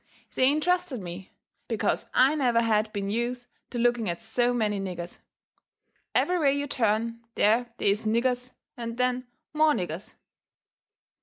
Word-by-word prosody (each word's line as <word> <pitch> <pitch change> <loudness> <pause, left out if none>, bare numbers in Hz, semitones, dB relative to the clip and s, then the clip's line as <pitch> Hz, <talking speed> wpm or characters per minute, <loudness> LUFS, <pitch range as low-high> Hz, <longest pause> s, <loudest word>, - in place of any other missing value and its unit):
They 260 +1 +4
intrusted 355 -2 0
me, 185 0 -8 0.4
because - - -1
I 265 +3 +5
never 245 -6 +2
had 215 -1 +2
been 200 -2 -3
use 240 +2 -2 0.2
to 245 - -5
looking 240 -3 +2
at 170 +5 -4
so 240 +2 +1
many 215 -4 0
niggers. 180 -3 -5 1.0
Every 360 0 +3
way 280 -3 +3
you 285 - -1
turn 230 -3 0 0.2
there 230 +3 +3
they 200 - +3
is 210 +2 -2
niggers 250 +2 +1 0.2
and 235 -1 -5
then 250 0 0 0.3
more 305 0 +4
niggers. 175 - -4
235 Hz, 145 wpm, -27 LUFS, 210-255 Hz, 1.0 s, I